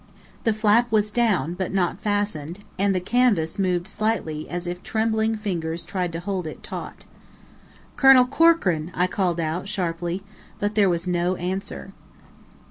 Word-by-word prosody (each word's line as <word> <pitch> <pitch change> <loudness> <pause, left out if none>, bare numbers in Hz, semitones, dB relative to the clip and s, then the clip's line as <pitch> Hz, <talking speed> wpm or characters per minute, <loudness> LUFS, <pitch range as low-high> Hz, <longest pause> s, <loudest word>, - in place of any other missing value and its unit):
The 225 - +4
flap 215 +2 +3
was 210 -1 +2
down, 210 -8 +1
but 185 0 -3
not 180 -3 0
fastened, 205 -6 -2 0.2
and 200 0 +2
the - - +2
canvas 205 -5 +1
moved 180 -2 0
slightly 200 -8 -2
as 175 0 -4
if 175 +1 -4
trembling 220 0 0
fingers 170 -6 -3
tried 180 -3 -2
to 165 - -3
hold 185 -1 -3
it 155 - -9
taut. - - -7 0.9
"Colonel 270 -2 +7
Corkran!" 250 - +3
I 180 - +3
called 185 -2 -1
out, 165 +4 -2
sharply. 175 -1 -2 0.4
But 205 +1 -1
there 205 -2 +4
was 170 0 -1
no 180 0 0
answer. 185 +2 -4
185 Hz, 150 wpm, -24 LUFS, 175-215 Hz, 0.9 s, Colonel